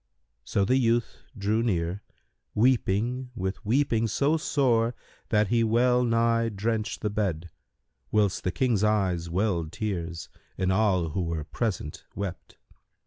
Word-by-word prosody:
So 100 - 0
the 130 +6 +3
youth 120 -2 +1 0.2
drew 105 +3 +1
near, 90 -4 -1 0.5
weeping 125 +1 +1
with 95 +1 -3
weeping 115 0 +2
so 140 +8 +2
sore, 120 -7 +1 0.3
that 105 -2 +2
he 115 0 +3
well 125 +2 +3
nigh 115 -1 +2
drenched 110 +1 -2
the 105 - -1
bed, 90 -6 -2 0.6
whilst 105 -3 +1
the 90 - 0
King's 115 +1 +1
eyes 95 -6 +1
welled 85 -3 0
tears 85 -5 -4 0.3
and 95 0 +1
all 95 -4 +2
who 90 +5 -2
were 80 -2 -2
present 90 -3 -3
wept. 100 -3 -6
105 Hz, 135 wpm, -27 LUFS, 95-115 Hz, 0.6 s, the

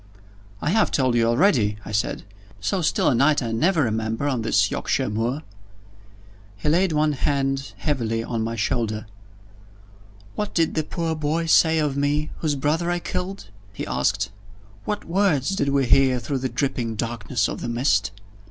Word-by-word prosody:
"I 150 - +1
have 220 +1 +3
told 130 -3 +1
you 115 -1 +3
already," 115 - +3
I - - -7
said. 105 0 -1 0.4
"So 110 - -1
still 160 - +1
a - - +4
night 140 +3 +3
I 115 - -3
never 160 +8 +2
remember 110 +3 -1
on 130 -5 0
this 110 - +2
Yorkshire - - -1
moor." 120 +8 -1 1.1
He 105 - -4
laid 175 +3 +3
one 155 0 +2
hand 135 -1 -1
heavily 115 -7 -1
on 115 -1 -2
my 115 +1 -3
shoulder. 110 -1 -1 1.3
"What 210 -1 -4
did 165 -2 +2
the 155 - 0
poor 165 +1 -2
boy 155 +2 -1
say 160 0 +4
of 150 -3 0
me, 145 +2 0
whose 155 -3 -1
brother 155 +5 0
I 175 - +1
killed?" 180 - -5 0.2
he - - -5
asked. 65 - 0 0.5
"What 210 -1 -3
words 170 -7 +1
did 140 -6 0
we 140 -1 +2
hear 130 +1 +4
through 135 +2 -3
the 130 0 -2
dripping 120 -3 -2
darkness 115 0 -1
of - - -5
the - - -3
mist?" 115 -4 +1
135 Hz, 170 wpm, -23 LUFS, 115-160 Hz, 1.3 s, a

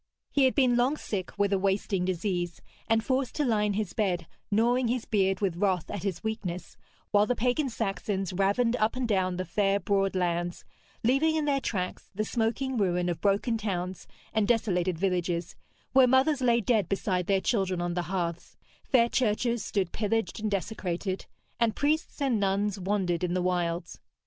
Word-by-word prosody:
He 280 -2 +4
had 260 - +2
been 255 -4 +4
long 260 +5 +2
sick 190 -9 -4
with 200 0 +2
a 195 - +2
wasting 195 -1 0
disease, 175 -2 -2 0.3
and 225 0 +3
forced 260 +1 -1
to 295 - +1
lie 215 -4 +2
in 205 - 0
his 205 -3 -2
bed, 180 -6 0 0.2
gnawing 240 +4 +2
his 240 0 -1
beard 195 -2 +1
with 185 -4 0
wrath 185 -3 0
at 205 - -4
his 195 -1 -3
weakness, 200 -5 -4 0.4
while 205 +1 +4
the 250 - +1
pagan 250 +5 +1
Saxons 195 -4 -2
ravened 200 +6 +2
up 215 +3 +1
and 255 -1 -1
down 185 -4 +1
the 185 - -2
fair 195 +3 +1
broad 195 -1 +1
lands, 175 -1 -1 0.4
leaving 275 +7 +3
in 310 -1 0
their 280 -2 +1
tracks 185 -7 -3
the 215 +2 -1
smoking 240 +4 -1
ruin 180 -2 +1
of 170 - -3
broken 210 +3 +1
towns 185 -3 -3 0.3
and 215 -2 +2
desolated 185 -7 +1
villages, 180 -2 -1 0.4
where 260 -1 +7
mothers 265 +3 +3
lay 235 -2 +3
dead 210 -5 +1
beside 185 -2 -1
their 195 -1 +3
children 190 -4 0
on 175 0 -1
the 175 - 0
hearths, 175 -3 -3 0.3
fair 235 -3 +4
churches 235 -1 0
stood 190 -4 -1
pillaged 220 -2 -1
and 215 0 -1
desecrated, 190 -2 -3 0.3
and 230 -2 +2
priests 305 +3 0
and 265 -6 +1
nuns 200 0 0
wandered 185 -2 0
in 180 0 0
the - - +1
wilds. 175 -1 -1
200 Hz, 180 wpm, -28 LUFS, 185-235 Hz, 0.4 s, where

